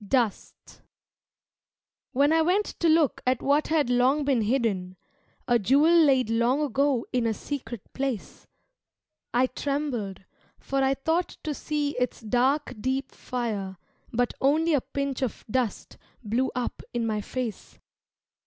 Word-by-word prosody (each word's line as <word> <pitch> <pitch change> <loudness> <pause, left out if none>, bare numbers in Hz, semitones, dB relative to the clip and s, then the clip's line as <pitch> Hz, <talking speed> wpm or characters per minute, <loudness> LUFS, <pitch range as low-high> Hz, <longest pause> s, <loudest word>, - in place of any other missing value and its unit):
Dust 225 -1 -2 1.3
When 285 +3 +3
I 325 - +4
went 370 +6 +2
to 335 - +3
look 315 -3 +3
at 255 -1 +1
what 285 +2 +2
had 310 -4 +2
long 260 +4 +3
been 270 -5 +2
hidden, 205 -6 0 0.5
A 240 -1 +4
jewel 280 - +4
laid 275 -7 +5
long 235 +4 +2
ago 275 -2 +1
in 245 -2 +1
a 220 - 0
secret 255 -5 -6
place, 265 -6 -4 0.8
I 245 +2 +3
trembled, 255 -8 -3 0.3
for 275 0 -2
I 265 0 +2
thought 325 +6 -1
to 305 - -2
see 295 0 -2
its 250 - -1
dark 255 +5 +1
deep 265 +2 -1
fire 210 -6 -4 0.3
But 245 +1 0
only 310 +4 +3
a 285 - +3
pinch 275 0 -3
of 255 -4 -3
dust 250 -4 -2 0.2
blew 240 +5 0
up 250 -1 -3
in 235 -1 0
my 215 -2 -1
face. 240 0 -5
260 Hz, 140 wpm, -26 LUFS, 235-285 Hz, 1.3 s, laid